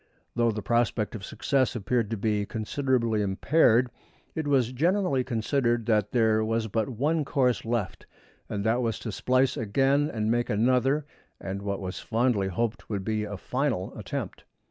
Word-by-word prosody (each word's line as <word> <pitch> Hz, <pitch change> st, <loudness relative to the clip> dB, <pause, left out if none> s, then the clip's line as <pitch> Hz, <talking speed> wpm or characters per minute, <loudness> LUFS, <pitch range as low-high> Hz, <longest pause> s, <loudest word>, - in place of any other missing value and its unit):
Though 120 Hz, -1 st, +3 dB
the 105 Hz, -2 st, -3 dB
prospect 115 Hz, -2 st, +1 dB
of 105 Hz, -4 st, -7 dB
success 130 Hz, +4 st, 0 dB
appeared 115 Hz, +1 st, 0 dB
to 115 Hz, -, -2 dB
be 105 Hz, 0 st, 0 dB
considerably 115 Hz, -1 st, 0 dB
impaired 120 Hz, +4 st, +3 dB, 0.4 s
it 160 Hz, -2 st, -3 dB
was 130 Hz, -4 st, +2 dB
generally 165 Hz, 0 st, +1 dB
considered 120 Hz, -1 st, 0 dB
that 105 Hz, -2 st, +1 dB
there 110 Hz, -2 st, +3 dB
was 115 Hz, 0 st, 0 dB
but 110 Hz, +4 st, -1 dB
one 150 Hz, +6 st, 0 dB
course 130 Hz, -4 st, +1 dB
left, 115 Hz, -4 st, -3 dB, 0.4 s
and 100 Hz, -1 st, -3 dB
that 115 Hz, +3 st, +2 dB
was 115 Hz, -2 st, -1 dB
to 110 Hz, -, -5 dB
splice 130 Hz, +5 st, +2 dB
again 135 Hz, +7 st, +2 dB
and 110 Hz, -1 st, -1 dB
make 120 Hz, +1 st, 0 dB
another 130 Hz, +6 st, +2 dB, 0.3 s
and 95 Hz, +1 st, -5 dB
what 100 Hz, -1 st, -3 dB
was 95 Hz, 0 st, -5 dB
fondly 115 Hz, -4 st, +1 dB
hoped 115 Hz, +5 st, -2 dB
would 100 Hz, -3 st, -3 dB
be 110 Hz, -1 st, -1 dB
a 105 Hz, -1 st, -6 dB
final 125 Hz, -4 st, -2 dB
attempt. -, -, -5 dB
115 Hz, 165 wpm, -27 LUFS, 105-130 Hz, 0.4 s, Though